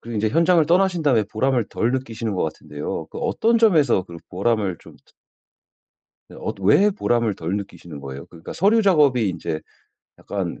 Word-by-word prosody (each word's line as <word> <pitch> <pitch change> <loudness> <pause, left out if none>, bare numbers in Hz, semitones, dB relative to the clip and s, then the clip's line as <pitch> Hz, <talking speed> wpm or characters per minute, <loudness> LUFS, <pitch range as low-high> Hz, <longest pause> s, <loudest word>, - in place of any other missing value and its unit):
그리고 115 -2 -5
이제 110 +1 +1
현장을 165 +4 +3
떠나신 180 0 +2
다음에 130 -7 +3
보람을 120 +3 0
덜 120 +3 -1
느끼시는 115 -5 -3
것 - - -1
같은데요. 75 -1 -5
그 - - -12
어떤 230 +1 +1
점에서 165 - +4
그런 85 -2 -11
보람을 100 -1 0
좀 - - -16
덜 - - -29 1.2
네. - - -13
어떠 95 - -5
왜 190 - +5
보람을 120 - 0
덜 85 +1 -4
느끼시는 85 -6 -8
거예요? 70 0 -8
그러니까 85 -2 -10
'서류 210 +5 +3
작업이 145 - +3
이제 80 -3 -4 0.6
약간 - - -5
115 Hz, 385 characters per minute, -22 LUFS, -, 1.2 s, 왜